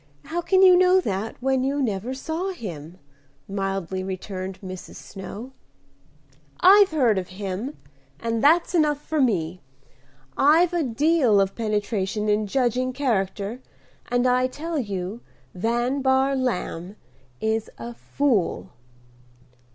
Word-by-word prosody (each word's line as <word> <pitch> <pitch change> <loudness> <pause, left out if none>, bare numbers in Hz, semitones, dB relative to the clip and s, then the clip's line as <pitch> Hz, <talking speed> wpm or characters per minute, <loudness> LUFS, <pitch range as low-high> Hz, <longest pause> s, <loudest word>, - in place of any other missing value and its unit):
how 345 +2 -2
can 375 +2 +3
you 370 -1 +8
know 365 +1 +5
that, 210 - -3
when 265 0 +1
you 275 +2 0
never 225 -2 -1
saw 320 +8 -3
him?" 175 - -8 0.5
mildly 195 -2 -3
returned 190 0 -5
Mrs. 185 -2 -9
Snow. 210 +6 -9 1.1
"I've 395 +2 +7
heard 245 -10 +2
of 180 - -6
him, 200 +8 -5 0.4
and 230 0 -2
that's 335 +5 +4
enough 300 -4 +2
for 310 0 -1
me. 180 -8 0 0.7
I've 325 +5 +4
a 345 - +1
deal 270 -3 +3
of 195 0 +1
penetration 210 -1 -1
in 210 0 +1
judging 255 +2 0
character, 220 -4 -1 0.5
and 245 0 +1
I 250 0 +3
tell 315 +4 -4
you 200 -1 -4 0.3
Van 240 +7 0
Bahr 265 +1 +2
Lamb 205 -7 -3 0.4
is 220 0 -1
a 240 +1 -7
fool." 240 -6 -1
235 Hz, 125 wpm, -24 LUFS, 195-285 Hz, 1.1 s, you